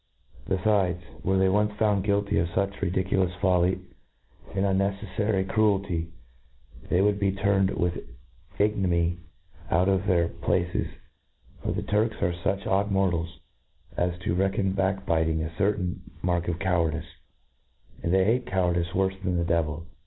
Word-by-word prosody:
Bcfides, 95 -2 0
were 95 +1 +2
they 95 0 +4
once 105 +2 +2
found 105 -2 +1
guilty 100 0 +1
of 85 - +1
fuch 85 - -12
5^2 - - -11
INTRODUCTION. 100 - -14
fuch - - -17
ridiculous 95 -1 0
folly, 90 0 +2 0.7
and 95 0 +1
unncceffary 100 0 0
cruelty, 100 -5 +1 0.8
they 90 - +3
would 100 0 +2
be 100 -1 +2
turned 95 0 +2
with 90 0 0 0.6
ignominy 90 -5 +1 0.5
out 90 +3 +3
of 100 +1 +1
their 85 -4 +3
pla 85 +1 0
ces - - 0 0.4
}— - - -29
for - - -2
the - - -2
Turks 110 +2 0
are 85 - +2
fuch 95 +3 -2
odd 100 +2 +1
mortals, 85 -4 0 0.5
as 90 0 0
to 90 - -1
reckon 95 +1 +1
back 95 0 0
»biting 80 -1 +1
a 80 0 -6
certain 100 -1 0 0.2
mark 85 -1 0
of 85 -2 -1
cowardice 85 -3 0
j - - -17 0.9
and 85 - -1
they 95 0 +4
bate 120 +5 +1
cowardice 90 -2 +1
worfc 95 0 0
than 90 -2 0
the 85 - 0
devil. 85 -1 0
95 Hz, 160 wpm, -26 LUFS, 85-100 Hz, 0.9 s, they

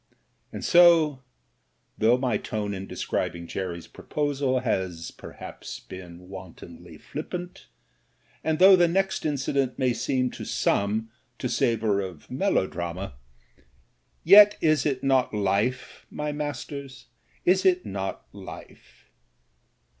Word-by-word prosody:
And - - -6
so, 165 -6 +6 0.7
though 115 +3 +3
my 125 -3 0
tone 105 -1 -4
in 95 0 -6
describing 85 -1 -3
Jerry's 85 -1 -5
proposal 140 -3 -1
has 95 -8 -2
perhaps - - -9
been 90 -1 -11
wantonly 90 -3 -11
flippant, 175 - -7 0.8
and 160 -1 0
though 190 +2 +8
the 175 -1 +4
next 190 0 0
incident 135 -2 -1
may 130 -2 +1
seem 130 +1 0
to - - -8
some 110 +3 0 0.3
to 130 - -3
savour 115 -4 +1
of 95 -5 -7
melodrama 95 - -1 0.6
— 65 -1 -38 0.3
yet, 205 +4 +8
is 155 -3 +2
it 135 -3 -2
not 135 -4 +2
life, 105 +5 -1
my 150 0 -3
masters, 145 -2 -6 0.4
is 185 +1 +4
it 185 -1 +3
not 95 -1 -4
life - - -12
125 Hz, 115 wpm, -26 LUFS, 95-150 Hz, 0.8 s, though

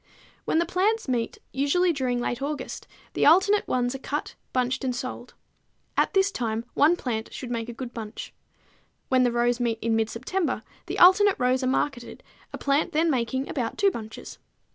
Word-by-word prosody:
When - - +1
the 340 - +3
plants 395 +5 0
meet, 240 -3 -1
usually 310 +7 +2
during 255 -4 -1
late 240 +1 -2
August, 290 +1 -4 0.3
the - - +3
alternate 390 +6 +5
ones 245 0 0
are 270 - -6
cut, 290 +2 -4 0.2
bunched 255 +1 0
and 255 -2 -1
sold. 250 0 -6 0.6
At - - +1
this 385 +1 +4
time 230 - -2
one 310 +5 +4
plant 225 -8 -4
should 250 -2 -7
make 230 -1 -3
a - - -5
good 240 0 -7
bunch. 220 -1 -7 0.8
When 255 -1 +4
the 245 -1 +3
rows 240 +1 +1
meet 235 -2 0
in 225 0 0
mid 225 0 +1
September, 260 - -2 0.2
the - - -4
alternate 380 +3 +7
rows 255 0 +2
are 255 - 0
marketed, 260 -2 -2 0.3
a - - -6
plant 280 +2 0
then 320 +2 +3
making 260 +1 -1
about 245 -5 -3
two 400 -1 +4
bunches. 220 -7 -8
255 Hz, 185 wpm, -26 LUFS, 240-315 Hz, 0.8 s, alternate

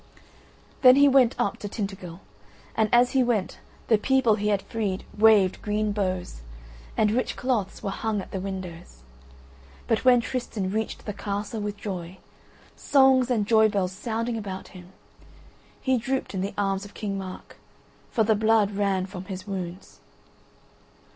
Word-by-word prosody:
Then 255 -1 +8
he 285 +1 +6
went 260 -3 +4
up 200 - 0
to 205 - -6
Tintagel 195 -4 -6 0.5
and 220 -1 +2
as 245 +1 +5
he 265 - +3
went 230 -6 -1 0.3
the 220 -3 +4
people 265 -1 +3
he 210 0 -1
had 200 -2 +1
freed 200 -3 -3
waved 210 -3 +4
green 210 0 -1
boughs, 185 - -3 0.6
and 210 -1 +3
rich 250 +3 -1
cloths 240 -7 -2
were 195 - -2
hung 215 +1 -2
at 190 - -8
the 190 - -3
windows. 185 - -7 0.8
But 225 - 0
when 250 -1 +6
Tristan 230 -6 -3
reached 220 +1 -3
the 210 - -4
castle 205 +2 -4
with 205 0 -4
joy, 185 -3 -6 0.6
songs 265 -2 +4
and 225 -5 +1
joy 220 0 +5
bells 195 -3 -1
sounding 230 +3 -3
about 190 -3 -7
him, 180 -1 -13 0.9
he 260 -2 +1
drooped 265 +1 -2
in 190 - -2
the 200 +2 -4
arms 195 -1 0
of 205 0 -12
King 200 -2 -3
Mark, 185 -1 -9 0.5
for 225 - +2
the 220 +1 +3
blood 215 -1 +3
ran 195 -2 0
from 185 -1 -8
his 190 -1 -7
wounds. 185 -2 -6
205 Hz, 160 wpm, -25 LUFS, 190-225 Hz, 0.9 s, Then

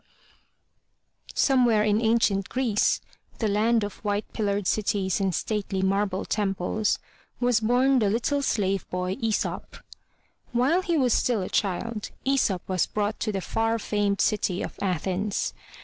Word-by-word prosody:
OMEWHERE 245 -6 +4
in 210 +1 +2
ancient 220 -4 +2
Greece, 245 -5 +1 0.4
the 220 - 0
land 220 +2 +2
of 205 - -5
white 205 0 -1
pillared 205 -2 -1
cities 195 -2 0
and 190 -3 0
stately 200 -3 -2
marble 195 0 0
temples, 205 +1 0 0.4
was 245 -2 +3
bom 250 +4 +3
the 210 -3 +2
little 245 +7 0
slave 195 -7 0
boy, 180 +1 -2
Aesop. 225 -3 -2 0.8
While 270 +10 +3
he 345 -3 0
was 255 -5 +3
still 230 -6 +1
a - - -5
child, 210 +3 -1 0.2
Aesop 240 -9 +1
was 185 -3 +1
brought 210 0 -2
to 215 - -1
the 195 -2 -2
far 225 +4 0
famed 205 -2 0
city 200 -4 0
of - - -5
Athens. 190 +2 -1
210 Hz, 140 wpm, -26 LUFS, 195-230 Hz, 0.8 s, OMEWHERE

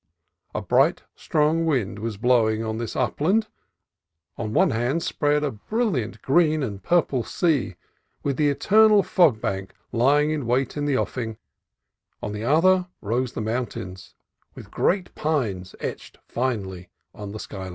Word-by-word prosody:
A - - -2
bright, - - +2
strong 155 +2 +1
wind 125 -11 0
was 110 -1 -4
blowing 115 -1 +2
on 110 0 -3
this 115 - -4
upland; 205 +9 +1 0.9
on 110 -2 -4
one - - +3
hand 125 +9 0
spread 150 -3 +1
a 145 - 0
brilliant 150 - -2
green 155 +1 +3
and 100 -6 -4
purple 165 -7 +2
sea, 160 -3 0 0.5
with 140 -1 0
the 150 0 +2
eternal 210 +7 +5
fog 170 - +3
bank 95 -2 -4 0.2
lying 145 +6 +3
in 145 -6 -2
wait 125 +2 0
in 145 -1 -2
the 140 -3 +1
offing; 115 -5 -3 0.8
on 105 - -4
the 105 +1 -5
other 180 +7 +3
rose 120 +4 -2
the - - -4
mountains, 110 -5 -4 0.4
with - - -11
great 185 -1 0
pines 115 -13 -2
etched - - -6
finely 100 -8 -3 0.2
on 100 -1 -8
the 110 - -6
sky 100 - -8
line. - - -6
130 Hz, 150 wpm, -24 LUFS, 110-155 Hz, 0.9 s, eternal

